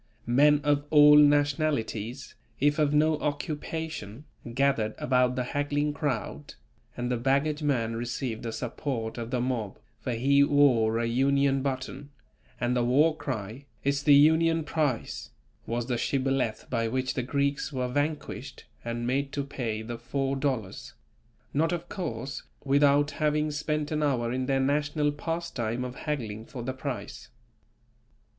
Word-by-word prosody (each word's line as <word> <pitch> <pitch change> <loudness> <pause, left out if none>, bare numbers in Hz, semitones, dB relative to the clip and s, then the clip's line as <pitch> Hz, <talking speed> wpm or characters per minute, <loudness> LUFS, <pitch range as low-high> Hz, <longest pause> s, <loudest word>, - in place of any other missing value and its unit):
Men 145 +5 +4
of 145 -1 +2
all 150 -1 +8
nationalities, 145 -5 +2 0.3
if 145 +2 +2
of 150 -2 +3
no 155 +1 +3
occupation, 150 -4 -4 0.3
gathered 125 -4 +1
about 125 -1 +2
the 125 - 0
haggling 145 +3 -1
crowd, 145 -1 -3 0.4
and 125 0 -2
the 125 - +1
baggage 140 +5 +1
man 120 -6 0
received 120 0 -3
the 115 - -4
support 120 -1 -4
of 115 0 -5
the 125 - -1
mob, 120 -5 -2 0.2
for 125 - -3
he 140 +4 +4
wore 125 -6 +4
a 115 - 0
Union 135 +3 +2
button, 135 +1 -4 0.5
and 120 +1 0
the 120 - +2
war 145 +6 +4
cry: 120 -2 -5 0.2
"It's 140 0 +1
the 145 0 +6
Union 160 +2 +4
price" 150 -7 -2 0.4
was 120 0 -2
the 120 -1 -1
Shibboleth 135 -5 -1
by 115 -2 0
which 130 +2 -1
the - - -1
Greeks 140 +4 -1
were 130 -2 -2
vanquished 145 0 -3 0.2
and 120 0 -3
made 135 +3 0
to 140 - -1
pay 115 -6 -4
the 115 +1 -6
four 135 +3 -2
dollars; 130 -8 -3 0.6
not 160 +4 +2
of 175 0 -4
course, 135 - -4 0.2
without 145 +1 +3
having 150 0 0
spent 150 0 -2
an 155 0 0
hour 125 -5 +1
in 130 0 -2
their 135 -1 +2
national 145 +2 +1
pastime 145 -7 -3
of 125 - -5
haggling 115 -8 -4
for 125 -2 -7
the 130 +2 -3
price. 130 -1 -6
135 Hz, 150 wpm, -28 LUFS, 120-145 Hz, 0.6 s, all